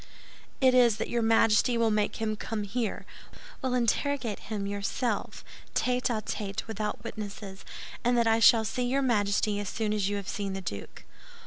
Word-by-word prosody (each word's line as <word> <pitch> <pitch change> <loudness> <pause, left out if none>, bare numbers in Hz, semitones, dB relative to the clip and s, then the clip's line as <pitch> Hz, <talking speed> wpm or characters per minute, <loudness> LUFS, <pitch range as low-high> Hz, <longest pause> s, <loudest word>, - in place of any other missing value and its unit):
"It 260 -1 +5
is 240 -4 +5
that - - -3
your 240 - +1
Majesty 225 +1 +4
will 230 -1 +3
make 210 -1 +1
him 220 -1 -1
come 215 0 -4
here, 220 +1 -3 0.6
will 260 -2 0
interrogate 245 -1 0
him 210 -2 -4
yourself, 205 +3 -2 0.3
tête 250 0 +1
à 220 -4 -1
tête, 200 -2 -4
without 215 -1 -4
witnesses, 205 -3 -7 0.4
and 245 0 +3
that 235 - +3
I 225 0 +3
shall 225 -1 +6
see 250 +4 -2
your 275 +2 +1
Majesty 205 -3 +1
as 205 -2 -3
soon 215 -2 -1
as 205 -2 0
you 205 - -1
have 200 -2 -5
seen 200 -2 -3
the 195 - -3
duke." 100 - -7
220 Hz, 180 wpm, -28 LUFS, 205-240 Hz, 0.6 s, shall